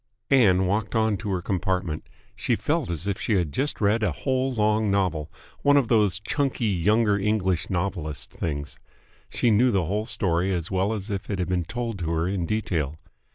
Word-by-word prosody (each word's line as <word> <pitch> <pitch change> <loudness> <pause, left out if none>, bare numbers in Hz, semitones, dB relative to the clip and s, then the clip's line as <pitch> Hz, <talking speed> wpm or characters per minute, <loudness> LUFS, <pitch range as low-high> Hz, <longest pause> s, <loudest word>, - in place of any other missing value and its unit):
Ann 95 -9 +5
walked 105 +4 -1
on 110 -1 +2
to 105 - -5
her 90 -3 -1
compartment. 90 -7 -2 0.3
She - - 0
felt - - -1
as 85 +1 -3
if 100 -1 -2
she 110 - 0
had 85 -6 0
just 140 - -1
read 105 +2 +2
a 105 -4 +1
whole 130 - -1
long 110 -2 +1
novel, 90 -6 0 0.3
one 145 0 +5
of 135 -5 +2
those 105 -5 +3
chunky 130 +3 -1
younger 105 +2 +2
English 95 -4 0
novelist 85 -5 -3
things. 70 -2 -4 0.5
She 120 - +1
knew 120 +5 +4
the 95 -7 +1
whole 105 +6 -2
story 95 -4 +1
as 85 +1 -4
well 95 +2 +1
as 105 0 -5
if 100 0 -4
it 100 - -1
had 90 -1 -2
been 90 -2 0
told 115 +1 -4
to 85 -2 -2
her 80 +1 0
in 90 -3 -1
detail. 80 -9 -1
100 Hz, 195 wpm, -25 LUFS, 90-110 Hz, 0.5 s, Ann